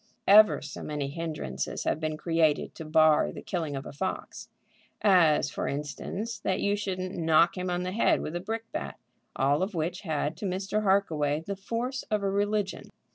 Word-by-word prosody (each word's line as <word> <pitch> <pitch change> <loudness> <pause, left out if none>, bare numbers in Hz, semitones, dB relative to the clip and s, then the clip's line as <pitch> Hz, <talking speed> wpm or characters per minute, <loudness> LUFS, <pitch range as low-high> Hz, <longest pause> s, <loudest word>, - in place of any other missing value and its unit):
Ever 210 +2 +7
so - - -7
many 145 -2 -3
hinderances 150 - -4
have - - 0
been 155 -1 -2
created 160 -1 +1
to 160 - -8
bar 155 0 +4
the - - -9
killing 160 -6 -3
a 135 0 -6
fox, 185 +6 -5 0.5
as 165 -9 +4
for - - -3
instance 170 +10 -4
that 190 0 -1
you 200 0 +1
shouldn't 185 -2 -3
knock 165 +1 +3
him 180 -1 -3
on 180 0 -1
the 185 - -3
head 215 - +3
with 155 - -5
a - - -1
brick 225 +5 -4
bat, 315 - -5 0.4
all 140 +4 +2
of 190 +1 -2
which 170 +3 -2
had 155 -4 -2
to 205 - -5
Mr. 195 +3 -1
Harkaway 160 -7 +1
the 200 +4 -5
force 235 +7 -3
of 210 -2 0
a 195 - +1
religion. 205 0 -1
180 Hz, 185 wpm, -28 LUFS, 155-200 Hz, 0.5 s, Ever